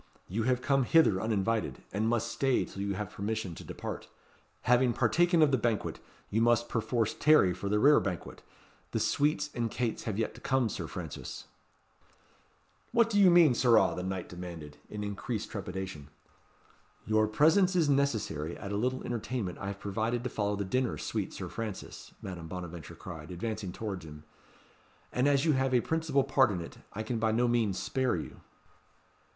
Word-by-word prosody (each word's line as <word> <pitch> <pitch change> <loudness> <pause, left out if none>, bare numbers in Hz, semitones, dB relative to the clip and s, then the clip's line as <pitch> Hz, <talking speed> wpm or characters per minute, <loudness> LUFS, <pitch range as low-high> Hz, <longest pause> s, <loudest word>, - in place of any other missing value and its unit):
"You 105 +6 -2
have 125 0 +1
come 135 -2 +2
hither 115 -11 +4
uninvited, 110 0 -1
and 110 +3 +1
must 120 0 0
stay 135 -2 +1
till 100 - -8
you 100 -1 -1
have 105 0 -4
permission 105 -2 -3
to - - -9
depart. - - -6 0.5
Having 125 0 +3
partaken 175 +5 +3
of 145 - +4
the 130 - +2
banquet, 115 -1 -1 0.3
you 110 - +2
must, 120 0 +3
perforce, 115 -1 0
tarry 150 -12 +5
for 100 +2 -4
the 105 - +2
rerebanquet. 105 - +2 0.5
The - - +1
sweets 150 +7 +1
and 120 -2 -1
cates 120 0 -2
have 105 -3 -2
yet 115 - -1
to - - -14
come, 130 -4 +1
Sir - - -4
Francis." - - -7 1.5
"What 230 -2 +3
mean 175 -5 +7
you, - - +2
sirrah?" 120 -2 +4
the - - -3
knight 95 -1 -3
demanded, 85 -5 -8
in 105 -1 -5
increased 105 +2 -4
trepidation. 95 -7 -5 1.0
"Your 110 0 +3
presence 165 - +4
is 165 -4 +3
necessary 110 - 0
at 100 - -6
a 100 - -1
little 130 +4 -1
entertainment 115 -5 -3
I 100 - -5
have 100 0 -5
provided 110 +4 -1
to 125 - -3
follow 105 -1 0
the 100 0 -3
dinner, 125 +5 0
sweet - - -3
Sir - - -6
Francis," 110 -4 -6
Madame 85 -4 -6
Bonaventure 85 -2 -7
cried, 80 -4 -9
advancing 100 +2 -4
towards 100 -2 -5
him; 75 -1 -11 0.9
"and 125 +3 +2
as 140 +1 +3
you 160 - +4
have 135 -1 +1
a 120 - +4
principal 160 -3 +1
part 135 -2 +4
in 95 -4 -2
it, 85 - -9
I 110 - -4
can 115 +1 -2
by 110 0 +2
no 120 +2 +2
means 115 -5 +1
spare 130 +7 0
you." - - -7
110 Hz, 175 wpm, -30 LUFS, 100-130 Hz, 1.5 s, mean